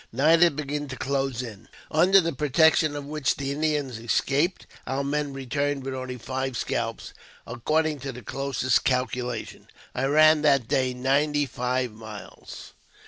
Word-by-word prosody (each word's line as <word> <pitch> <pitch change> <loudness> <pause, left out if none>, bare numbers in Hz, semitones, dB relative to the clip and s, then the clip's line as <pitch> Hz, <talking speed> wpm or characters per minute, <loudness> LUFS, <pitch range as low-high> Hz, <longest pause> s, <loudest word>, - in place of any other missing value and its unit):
Night 155 +7 +4
had 170 -4 +5
begun 145 0 -3
to 130 - -6
close 135 -2 -2
in, 110 -5 -10 0.2
under 180 +5 +5
the 165 -3 -1
protection 155 +2 +3
of 145 -1 -5
which 150 -2 -1
the 140 0 -3
Indians 145 -5 -1
escaped; 140 +9 0 0.2
our 135 +1 -1
men 145 0 -1
returned 140 +1 -2
with 135 0 -4
only 130 -1 -5
five 130 +1 -3
scalps. - - -3 0.3
According 155 +6 -1
to 135 +1 -5
the 125 -1 -10
closest 135 0 0
calculation, 125 -2 -2 0.3
I 130 - -1
ran 155 +2 +5
that 140 -6 +3
day 130 0 0
ninety 145 +3 +1
five 125 -1 -2
miles. 110 -1 -11
135 Hz, 150 wpm, -25 LUFS, 125-150 Hz, 0.3 s, had